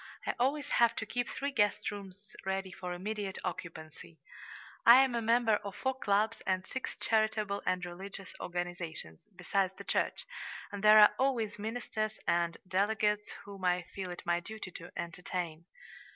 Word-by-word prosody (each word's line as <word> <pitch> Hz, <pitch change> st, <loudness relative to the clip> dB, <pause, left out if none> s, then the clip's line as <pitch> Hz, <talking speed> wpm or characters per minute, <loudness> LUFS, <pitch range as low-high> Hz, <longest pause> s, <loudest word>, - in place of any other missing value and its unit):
I -, -, 0 dB
always 280 Hz, +3 st, +1 dB
have 235 Hz, -1 st, +4 dB
to 220 Hz, -, -3 dB
keep 245 Hz, +2 st, -2 dB
three 280 Hz, +1 st, -2 dB
guest 205 Hz, -6 st, +1 dB
rooms 200 Hz, 0 st, -10 dB
ready 190 Hz, 0 st, -2 dB
for 180 Hz, -1 st, -6 dB
immediate 195 Hz, +2 st, -3 dB
occupancy. 165 Hz, -2 st, -7 dB, 0.7 s
I 235 Hz, -, +10 dB
am 265 Hz, -2 st, 0 dB
a 235 Hz, -, 0 dB
member 230 Hz, -1 st, +4 dB
of 200 Hz, -2 st, -7 dB
four 265 Hz, 0 st, 0 dB
clubs 220 Hz, -2 st, +1 dB
and 185 Hz, 0 st, +1 dB
six 260 Hz, -, -5 dB
charitable 215 Hz, -2 st, +1 dB
and 185 Hz, -1 st, +1 dB
religious 190 Hz, +1 st, -8 dB
organizations, 175 Hz, -, -5 dB
besides 190 Hz, +1 st, 0 dB
the -, -, -8 dB
church, -, -, 0 dB, 0.5 s
and 205 Hz, -1 st, -6 dB
there 215 Hz, 0 st, +9 dB
are 210 Hz, -, +9 dB
always 235 Hz, -5 st, +1 dB
ministers 215 Hz, -1 st, -3 dB
and 170 Hz, -1 st, +2 dB
delegates 210 Hz, +2 st, +1 dB, 0.2 s
whom 200 Hz, -2 st, -10 dB
I 180 Hz, -1 st, +2 dB
feel 190 Hz, -2 st, -4 dB
it 175 Hz, -, -7 dB
my 175 Hz, 0 st, +2 dB
duty 210 Hz, +1 st, -7 dB
to 170 Hz, 0 st, -9 dB
entertain." 170 Hz, -1 st, -4 dB
200 Hz, 160 wpm, -32 LUFS, 180-220 Hz, 0.7 s, I